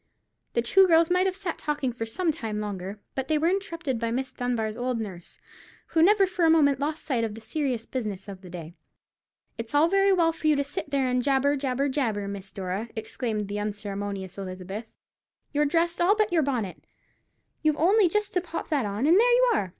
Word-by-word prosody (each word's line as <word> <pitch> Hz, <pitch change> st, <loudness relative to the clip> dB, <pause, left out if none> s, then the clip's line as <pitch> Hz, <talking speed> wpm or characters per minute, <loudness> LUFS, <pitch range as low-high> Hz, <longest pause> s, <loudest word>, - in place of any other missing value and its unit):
The 235 Hz, -, +1 dB
two 380 Hz, +11 st, +5 dB
girls 330 Hz, 0 st, +4 dB
might 365 Hz, +1 st, +3 dB
have 375 Hz, -, -1 dB
sat 375 Hz, -4 st, -4 dB
talking 290 Hz, -4 st, -1 dB
for 225 Hz, -1 st, -4 dB
some 325 Hz, +9 st, 0 dB
time 220 Hz, -7 st, -4 dB
longer, 200 Hz, -1 st, -5 dB
but 265 Hz, -1 st, -3 dB
they 310 Hz, -, +2 dB
were 320 Hz, +3 st, +2 dB
interrupted 335 Hz, -, -2 dB
by 230 Hz, 0 st, -1 dB
Miss 260 Hz, +3 st, -2 dB
Dunbar's 230 Hz, -3 st, -2 dB
old 245 Hz, 0 st, -2 dB
nurse, 185 Hz, -6 st, -7 dB, 0.5 s
who 325 Hz, -, +2 dB
never 395 Hz, +3 st, +6 dB
for 365 Hz, -1 st, -2 dB
a 325 Hz, -, +6 dB
moment 285 Hz, -4 st, +4 dB
lost 300 Hz, +2 st, -3 dB
sight 245 Hz, -5 st, 0 dB
of 220 Hz, -2 st, -3 dB
the -, -, -8 dB
serious 250 Hz, -1 st, -2 dB
business 210 Hz, -7 st, -4 dB
of 195 Hz, -2 st, -8 dB
the 185 Hz, -, -11 dB
day. 170 Hz, -2 st, -8 dB, 0.9 s
"It's 230 Hz, +4 st, -5 dB
all 300 Hz, +3 st, +5 dB
very 390 Hz, +1 st, +4 dB
well 335 Hz, -3 st, +3 dB
for 320 Hz, -1 st, -3 dB
you 305 Hz, -, +5 dB
to 280 Hz, -, +1 dB
sit 285 Hz, +1 st, -5 dB
there 270 Hz, -3 st, +1 dB
jabber, 275 Hz, +2 st, +2 dB
jabber, 270 Hz, 0 st, 0 dB
jabber, 225 Hz, -8 st, -1 dB
Miss 200 Hz, -1 st, -7 dB
Dora," 195 Hz, +4 st, -4 dB
exclaimed 220 Hz, -1 st, -3 dB
the 205 Hz, +1 st, -3 dB
unceremonious 200 Hz, -2 st, -4 dB
Elizabeth; 190 Hz, +3 st, -6 dB, 0.6 s
"you're 295 Hz, +1 st, +2 dB
dressed, 335 Hz, +3 st, +1 dB
all 380 Hz, +4 st, +5 dB
but 430 Hz, -3 st, +1 dB
your 330 Hz, -, +4 dB
bonnet. 245 Hz, -10 st, -2 dB, 0.8 s
You've 310 Hz, -1 st, +2 dB
only 375 Hz, +4 st, +4 dB
just 420 Hz, +2 st, -1 dB
to 360 Hz, -, +2 dB
pop 335 Hz, -1 st, -6 dB
that 280 Hz, -8 st, +1 dB
on, 205 Hz, +6 st, -2 dB
and 340 Hz, +6 st, +6 dB
there 485 Hz, +2 st, +5 dB
you -, -, +5 dB
are. 190 Hz, -, 0 dB
265 Hz, 210 wpm, -26 LUFS, 210-330 Hz, 0.9 s, never